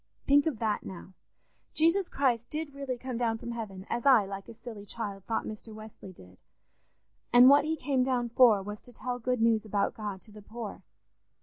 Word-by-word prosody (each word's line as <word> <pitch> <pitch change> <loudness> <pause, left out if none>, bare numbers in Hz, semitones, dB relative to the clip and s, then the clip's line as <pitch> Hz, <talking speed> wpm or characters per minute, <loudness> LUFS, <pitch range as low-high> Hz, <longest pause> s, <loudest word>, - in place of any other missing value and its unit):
"Think 285 +2 +4
of 295 -8 -1
that 215 -2 -1
now! 190 0 -10 0.6
Jesus 335 +4 +2
Christ 245 -4 0
did 305 -2 -4
really 275 -3 -4
come 255 -1 -5
down 230 -2 0
from 235 - -7
heaven, 205 -5 -6
as 240 - -3
I, 255 -7 +6
like 195 0 -7
a - - -9
silly 220 -3 -9
child, 200 -2 -6
thought 225 - -2
Mr. 215 0 -8
Wesley 215 -3 -11
did; 90 - -17 0.9
and 245 +2 +8
what 285 +1 +6
he 320 +1 0
came 270 -3 0
down 250 -2 0
for 230 -4 +5
was 210 +1 -7
to 245 - -14
tell 245 +1 -4
good 250 -1 0
news 225 -2 +3
about 205 -2 -1
God 205 -3 -5
to 220 - -14
the 210 0 -12
poor. 220 +1 -8
230 Hz, 200 wpm, -29 LUFS, 210-255 Hz, 0.9 s, and